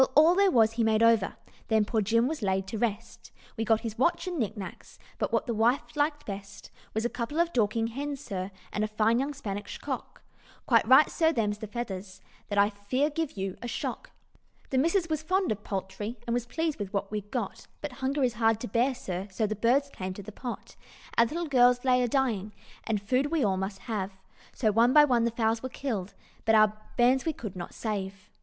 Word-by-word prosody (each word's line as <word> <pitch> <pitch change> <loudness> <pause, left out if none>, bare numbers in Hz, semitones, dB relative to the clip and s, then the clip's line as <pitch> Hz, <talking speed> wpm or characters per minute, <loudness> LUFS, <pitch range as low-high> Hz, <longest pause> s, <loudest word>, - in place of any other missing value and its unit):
all 315 +4 +7
there 395 +1 +4
was 225 -8 +4
he 230 0 0
made 220 0 +3
over, 230 -3 +4 0.3
Then 220 -2 +3
poor 220 +1 0
Jim 230 +3 +2
was 310 -2 -3
laid 190 -1 0
to 220 - -4
rest 220 -3 -3 0.2
We 225 - -1
got 225 0 +2
his 225 -1 -5
watch 340 +7 +2
and 355 -3 -3
knicknacks, 210 -4 -5 0.2
But - - -1
what - - +1
the 240 - -1
wife 235 +7 +1
liked 295 0 0
best 200 0 -8 0.2
Was 220 +1 0
a - - +4
couple 245 +6 -3
of 340 0 +2
Dorking 225 -1 +1
hens, 280 +4 -4
sir, 195 -9 -4 0.2
And 210 - 0
a - - +1
fine 215 +2 +2
young 275 +2 -1
Spanish 205 -6 -5
cock; - - -6 0.4
Quite 230 -3 +4
right, 265 +5 +8
sir, 320 -1 +2
them's 210 -7 -1
the 215 - -6
feathers, 195 -4 -6 0.3
That 205 - -3
I 200 +1 +5
fear 255 +9 -1
give 320 -1 -2
you 195 -1 -4
a 240 - -4
shock. 235 - -4 0.6
"The 260 - +3
missus 335 +5 +2
was 310 -2 -1
fond 370 - +1
of 210 -1 -3
poultry, 205 +4 -4
And 235 - -1
was 240 0 -1
pleased 320 +3 -2
with 200 -2 -4
what 200 0 -2
we'd 210 -1 -4
got; 230 -5 -4
But 295 - -5
hunger 270 +2 0
is 245 -2 +2
hard 225 -1 +2
to 245 - -3
bear, 245 +6 +1
sir, 190 -4 -5
So 205 +3 -1
the 215 +1 -2
birds 245 +7 +2
came 185 0 -5
to 200 - -8
the 215 - -9
pot. 245 +3 -7 0.4
Our 235 - +6
little 340 +7 -3
gals 245 -2 +4
lay 250 -1 +4
a 245 - +2
dying, 225 -6 0 0.3
And 220 -2 0
food 255 +8 +1
we 320 -1 +1
all 195 -3 +2
must 190 +1 -3
have, 205 -5 -3 0.4
So 220 -4 +1
one 230 +4 +4
by 300 -1 +8
one 240 -4 +2
the - - +2
fowls 225 0 0
were 260 - -4
killed, 220 -8 -4 0.3
But 225 - +4
our 215 -1 +5 0.2
bairns 250 +2 +4
we 320 - -1
could 215 -9 -7
not 175 -1 -7
save. 195 -3 -4
230 Hz, 220 wpm, -28 LUFS, 205-265 Hz, 0.6 s, right